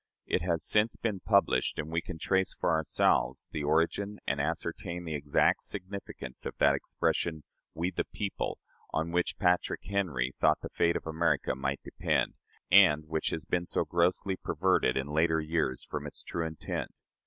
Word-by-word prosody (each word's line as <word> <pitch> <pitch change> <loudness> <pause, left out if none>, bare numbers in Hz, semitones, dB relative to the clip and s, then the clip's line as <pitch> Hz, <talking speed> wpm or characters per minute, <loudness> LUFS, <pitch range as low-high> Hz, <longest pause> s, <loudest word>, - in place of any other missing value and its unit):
It - - 0
has 85 -2 0
since 105 +2 +3
been 105 -4 -2
published, 100 +1 +2
and 80 - -4
we 85 +1 0
can 90 - -7
trace 95 +3 +1
for - - 0
ourselves 80 -1 +2
the 75 - -3
origin, 85 +7 +1
and 70 +1 0
ascertain 85 +3 -3
the 80 - -4
exact 75 -1 +2
significance, 90 -9 -6
of - - -6
that 70 -1 +5
expression, 80 +3 -1 0.3
"We, 85 +3 -1
the - - -2
people," 100 -2 -3 0.3
on 80 +1 -1
which 90 +1 0
Patrick 90 -2 +1
Henry 75 -11 -1
thought 75 0 +4
the - - -6
fate 85 0 +2
of - - -3
America 80 0 +1
might 70 +1 -3
depend, - - 0 0.4
and 85 -6 +7
which 80 -1 0
has 80 - -4
been 90 0 0
so - - 0
grossly 90 +2 +1
perverted 90 -7 +1
in 65 - 0
later 80 +2 +2
years 75 -5 -1
from - - -5
its - - -7
true 85 -1 -2
intent. 80 -1 -4
85 Hz, 170 wpm, -30 LUFS, 75-90 Hz, 0.4 s, and